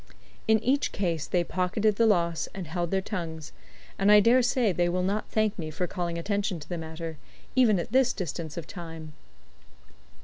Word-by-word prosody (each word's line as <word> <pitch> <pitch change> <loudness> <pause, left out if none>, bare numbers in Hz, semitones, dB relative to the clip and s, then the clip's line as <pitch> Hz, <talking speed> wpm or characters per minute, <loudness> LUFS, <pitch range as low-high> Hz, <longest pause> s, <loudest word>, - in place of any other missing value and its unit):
In 220 - +6
each 275 +3 +1
case 170 -6 -2
they 175 -1 +1
pocketed 195 +4 0
the 230 - +4
loss 170 -5 +1
and 190 -2 -5
held 170 +1 -2
their 190 +1 0
tongues, 165 -7 -5 0.5
and 195 +2 +4
I 210 - +9
dare 235 +5 +5
say 240 -3 +2
they 175 0 +1
will 180 +1 0
not 200 +3 -1
thank 215 -2 0
me 155 -2 -4
for 155 +4 -2
calling 175 -2 -3
attention 200 0 -1
to 150 - -11
the 175 -1 -4
matter, 160 0 -6 0.4
even 235 -6 +5
at 170 - -4
this 260 0 +4
distance 170 -4 -5
of 165 - -4
time. 165 -3 -8
180 Hz, 190 wpm, -27 LUFS, 165-210 Hz, 0.5 s, I